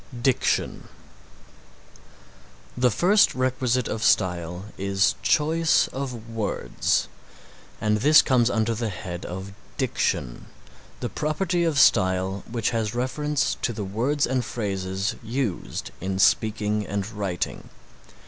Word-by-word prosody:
DICTION 125 +1 0 1.9
The 125 0 +3
first 185 - +4
requisite 130 -1 0
of 110 - -3
style 90 -4 +1
is 95 0 +1
choice 160 +1 +3
of 125 -4 -6
words, 115 -2 -1 0.7
and 105 0 +1
this 150 +8 +6
comes 125 -3 +3
under 115 0 +1
the 115 0 -2
head 90 -2 -6
of 95 +2 -7 0.2
Diction, - - -1 0.5
the - - -2
property 170 +3 -1
of 160 -4 0
style 95 -2 +3
which 115 -1 -1
has 115 -1 -2
reference 145 +3 -1
to - - 0
the 105 -2 -4
words 125 +9 0
and 130 -1 0
phrases 95 -3 -2
used 115 - -3
in 95 +1 -2
speaking 105 +1 +2
and 100 -1 -2
writing. 100 -5 -4
110 Hz, 115 wpm, -25 LUFS, 95-130 Hz, 1.9 s, this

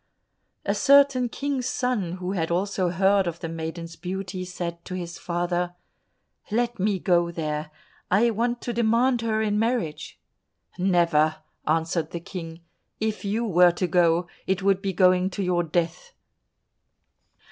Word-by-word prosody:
A - - +1
certain 275 -3 +5
King's 275 0 -2
son 250 -9 -1
who 180 0 -4
had 165 -4 -1
also 185 +1 0
heard 190 +2 +3
of 170 -1 -4
the 165 - -4
maiden's 165 +1 -6
beauty, 185 +1 -5
said 175 -2 -5
to 185 - -5
his 175 -2 -6
father, 175 0 -2 0.7
"Let 235 +1 0
me 200 +1 +1
go 175 -2 +2
there, 155 -2 -3 0.4
I 225 +5 +4
want 240 +2 -1
to 240 - -3
demand 235 +2 +2
her 220 -1 0
in 210 -1 +1
marriage." 225 -9 -2 0.6
"Never," 170 -4 +3 0.3
answered 160 +1 0
the 170 - -5
King; 165 -1 -8 0.4
"if 220 0 -2
you 215 +4 -1
were 180 -4 +5
to 180 - -1
go, 175 -1 +3 0.2
it 190 0 0
would 195 -1 +3
be 195 -1 -1
going 185 0 +4
to 195 +1 -3
your 180 -1 +1
death." 170 - -2
185 Hz, 145 wpm, -25 LUFS, 170-220 Hz, 0.7 s, certain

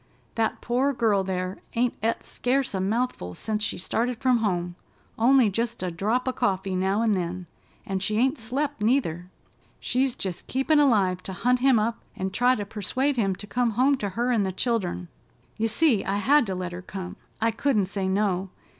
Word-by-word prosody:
That 225 -1 -1
poor 260 +4 +1
girl 215 -6 +2
there 185 0 -3 0.2
ain't 240 +1 +2
et 225 +2 0
scarce 260 0 0
a 190 - -1
mouthful 200 - -1
sence 215 -1 -2
she - - -2
started 235 +6 -1
from 255 -2 +3
home—only 215 +5 0
just 230 +1 -2
a 180 - -2
drop 220 +9 -1
o' - - +2
coffee 195 -5 -1
now 190 +4 +1
an' 225 - +2
then—and 185 +1 -5
she 210 +2 0
ain't 260 +5 +2
slep' 270 +3 -2
neither. 185 - +1 0.5
She's 255 0 0
jest 185 -2 -5
keepin' 270 +4 +2
alive 200 -10 +3
to 190 - -6
hunt 250 +7 +1
him 260 -1 +4
up 225 +2 0 0.2
and 190 0 -3
try 245 +5 +3
to 205 - -4
persuade 255 +7 -1
him 195 -6 +1
to 205 - -9
come 240 +1 0
home 270 +3 +4
to 205 -5 -3
her 245 +1 +1
an' 230 -4 +2
the 190 -1 0
children. 190 -4 -1 0.5
You 225 0 +1
see, 235 -2 +3
I 195 - -1
had 275 +4 +4
to 190 - -2
let 180 -1 -4
her 175 +1 -6
come. 185 0 -7 0.2
I 230 +1 +2
couldn't 225 -6 +1
say 195 0 -3
no. 190 -1 0
215 Hz, 190 wpm, -26 LUFS, 190-250 Hz, 0.5 s, him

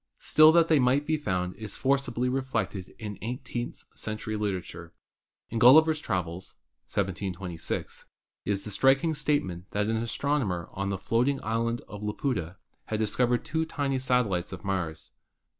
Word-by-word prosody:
Still 155 +1 +6
that 165 -1 +5
they 155 -3 +4
might 130 +3 +3
be 155 - +1
found 90 -11 -2
is 110 -2 -5
forcibly 135 -2 +1
reflected 115 -8 -2
in 105 -2 -6
eighteenth 120 +1 -5
century 110 0 -4
literature. 90 -5 -4 0.6
In 115 - -1
"Gulliver's 155 +6 +7
Travels" 90 - -3 0.3
(1726) 95 -3 -4 0.4
is 100 -1 -1
the 105 - -4
striking 135 - +3
statement 95 - -1
that 105 0 +1
an 110 +1 0
astronomer 115 - -1
on 100 0 -2
the 95 - -1
floating 125 +8 +1
island 115 +2 -1
of 105 - -8
Laputa 105 - -2 0.3
had 110 - -2
discovered 120 +3 +1
two 160 0 0
tiny 140 -4 -1
satellites 125 -9 +1
of 95 -3 -8
Mars. 85 -8 -3
110 Hz, 140 wpm, -28 LUFS, 95-135 Hz, 0.6 s, Gulliver's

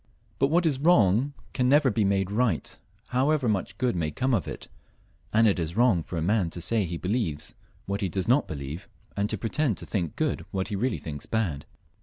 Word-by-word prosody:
But 135 - +4
what 170 +4 +2
is 145 -5 +2
wrong 135 - +4 0.2
can 125 -1 +1
never 145 -2 +5
be 110 0 +1
made 95 -1 +1
right, 105 -6 0 0.3
however 135 +1 +2
much 100 -4 -1
good 125 -4 0
may 80 -3 0
come 130 +11 -1
from 115 -7 0
it; - - -8 0.6
and 115 +1 +5
it 100 -3 +2
is 85 +2 -3
wrong 115 -8 +4
for 85 - -6
a 80 - -1
man 100 -1 +2
to 85 - -7
say 100 +4 +1
he 85 0 -4
believes 90 -5 -2 0.3
what 100 +1 -3
he 95 - 0
does 95 +2 -2
not 130 +5 +3
believe, 75 - -6 0.3
and 100 +1 0
to - - -2
pre 115 - -4
tend 145 -10 +1
to - - -7
think 85 -7 -2
good - - -1
what 95 +1 -2
he 105 - -2
really 125 +6 0
thinks 75 -3 -7
bad. 90 -11 -1
105 Hz, 220 wpm, -27 LUFS, 90-125 Hz, 0.6 s, never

